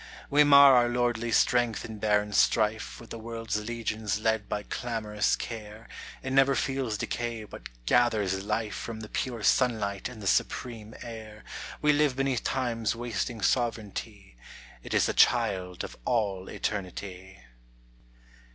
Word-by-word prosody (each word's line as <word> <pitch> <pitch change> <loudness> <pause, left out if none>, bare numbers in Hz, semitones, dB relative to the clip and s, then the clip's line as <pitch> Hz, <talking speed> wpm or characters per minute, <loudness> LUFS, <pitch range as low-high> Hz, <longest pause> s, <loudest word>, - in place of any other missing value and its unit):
We 145 +1 +6
mar 140 -1 +8
our 120 0 +4
lordly 120 -1 0
strength 120 -1 +2
in 110 -2 -8
barren 105 0 +1
strife 110 +1 +2
With 115 - -13
the 115 - -6
world's 115 -1 -4
legions 110 -4 -2
led 110 -1 0
by 105 - -2
clamorous 110 -3 -1
care, 110 -1 -8 0.4
It 130 - -3
never 135 0 +5
feels 130 -5 -1
decay 120 -1 -3
but 105 - -10 0.2
gathers 105 - +2
life 105 +1 -2
From 110 -1 -6
the 110 - -8
pure 120 -4 -3
sunlight 110 -6 +1
and 125 -3 -11
the 105 - -8
supreme 110 +2 -1
air, 110 -2 -9 0.4
We 150 0 +5
live 145 -2 +2
beneath 135 -3 0
Time's 115 -4 -1
wasting 115 -1 -3
sovereignty, 105 - -2 0.4
It - - -4
is - - +4
the - - 0
child 90 -2 +2
of - - -7
all 100 - 0
eternity. 95 -1 -5
110 Hz, 140 wpm, -28 LUFS, 105-120 Hz, 0.4 s, mar